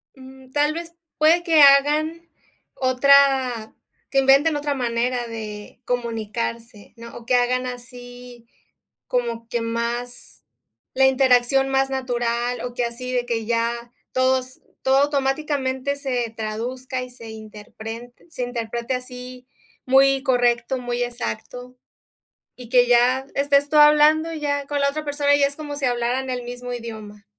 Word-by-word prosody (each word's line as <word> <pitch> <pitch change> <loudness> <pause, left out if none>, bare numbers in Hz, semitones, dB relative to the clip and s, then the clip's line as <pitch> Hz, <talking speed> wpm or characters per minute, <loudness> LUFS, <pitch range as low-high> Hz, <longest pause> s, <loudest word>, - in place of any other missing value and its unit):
Mm, 265 -1 -15
tal 295 +2 +1
vez, 335 0 -7 0.2
puede 325 +3 +4
que 325 -4 +4
hagan, 300 +4 +4 0.5
otra 260 -3 +3 0.4
que 275 - +2
inventen 275 +4 +4
otra 290 0 -1
manera 240 -1 -1
de 215 -1 -8
comunicarse, 230 -2 -4
¿no?, 235 0 -11
o 235 - -12
que 250 +1 +2
hagan 250 +1 +1
así, 245 -1 -10 0.6
como 235 -2 -2
que 235 - -1
más, 235 - -4 0.5
la 265 0 +4
interacción 265 0 +3
más 270 0 +1
natural, 245 -2 -2
o 245 -1 -5
que 245 -1 -1
así 250 +2 -6
de 245 -1 0
que 230 -2 -2
ya 235 +1 -2 0.2
todos 260 0 0 0.2
todo 265 +1 +4
automáticamente 280 -1 -1
se 245 -5 -2
traduzca 250 +4 -4
y 250 - -9
se 230 -2 -10
interpren 220 +2 -9 0.2
se 290 -6 -4
interprete 235 0 -4
así 250 0 -8 0.4
muy 270 +1 +4
correcto, 245 -1 +1
muy 245 0 -2
exacto, 245 - -6 0.8
y 245 -2 -12
que 245 -1 +4
ya 250 +2 +3
estés 280 0 +2
tú 305 - -2
hablando 300 +2 +5
ya 285 -2 -2
con 290 0 -2
la 280 - +3
otra 305 +2 -4
persona 285 0 +2
y 285 - +2
es 280 0 +1
como 295 -2 -6
si 285 - -7
hablaran 245 +2 -1
el 250 -1 -3
mismo 245 0 -7
idioma. 215 -3 -8
250 Hz, 140 wpm, -22 LUFS, 235-275 Hz, 0.8 s, hablando